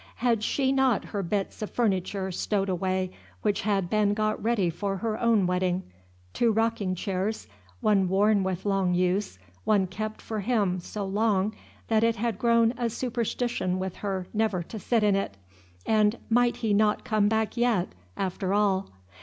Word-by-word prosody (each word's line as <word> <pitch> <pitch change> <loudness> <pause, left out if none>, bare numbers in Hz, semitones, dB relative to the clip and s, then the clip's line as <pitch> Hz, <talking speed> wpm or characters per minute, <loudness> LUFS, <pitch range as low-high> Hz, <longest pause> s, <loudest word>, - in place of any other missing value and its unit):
Had 235 -3 +1
she 265 +4 +1
not 265 -4 +2
her 205 - -3
bits 195 +3 -2
of 215 - -3
furniture 190 -3 -1
stowed 195 +2 -1
away 185 0 -1 0.3
which 210 -2 +1
had 200 -3 0
been 205 +1 +2
got 215 0 0
ready 215 -6 +1
for 195 +3 -3
her 220 +2 -2
own 230 -5 +3
wedding, 180 0 0 0.5
two 235 -1 +2
rocking 220 -4 0
chairs, 195 - -2 0.3
one 195 -3 +3
worn 200 +2 +3
with 190 0 -2
long 195 -3 +1
use, 185 - 0 0.3
one 205 -3 +3
kept 215 +4 -5
for 220 -1 -4
him 200 -4 +1
so 200 +3 -5
long 205 0 +1 0.3
that 220 -1 +2
it 230 0 +3
had 225 -2 -2
grown 230 0 +4
a 240 -1 +1
superstition 235 -5 -2
with 185 -1 -4
her 190 -3 -3
never 215 -5 0
to 215 +6 -8
sit 225 +2 +1
in 205 -2 +4
it, 195 - -2 0.5
and 215 +1 +3
might 240 +1 +4
he 220 -3 0
not 210 +1 +2
come 215 -2 +2
back 220 0 0
yet, 235 -7 +1 0.3
after 190 +1 -1
all? 195 -2 +1
205 Hz, 170 wpm, -27 LUFS, 190-225 Hz, 0.5 s, grown